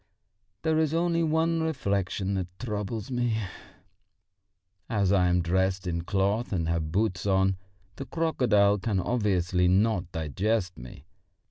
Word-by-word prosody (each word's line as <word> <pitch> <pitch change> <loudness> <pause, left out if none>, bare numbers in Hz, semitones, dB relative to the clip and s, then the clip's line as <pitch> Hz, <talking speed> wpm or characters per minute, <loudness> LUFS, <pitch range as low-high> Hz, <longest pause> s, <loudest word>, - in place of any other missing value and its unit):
There 160 -1 +2
is 160 0 +1
only 170 0 +1
one 165 +1 +1
reflection 100 - -1
rather 95 -2 -2
troubles 105 0 -4
me: 120 -3 0 1.5
as 100 -4 +1
I 95 -2 +4
am 90 0 +2
dressed 95 +2 0
in 85 -1 -2
cloth 100 +5 0
and 85 -5 -1
have 80 -2 -1
boots 95 -1 0
on, 95 0 +3 0.4
the 135 - -5
crocodile 110 -11 +2
can 100 -1 -1
obviously 90 -5 +1
not 95 -1 +2
digest 90 +5 -1
me. 65 +4 -11
100 Hz, 130 wpm, -27 LUFS, 90-120 Hz, 1.5 s, I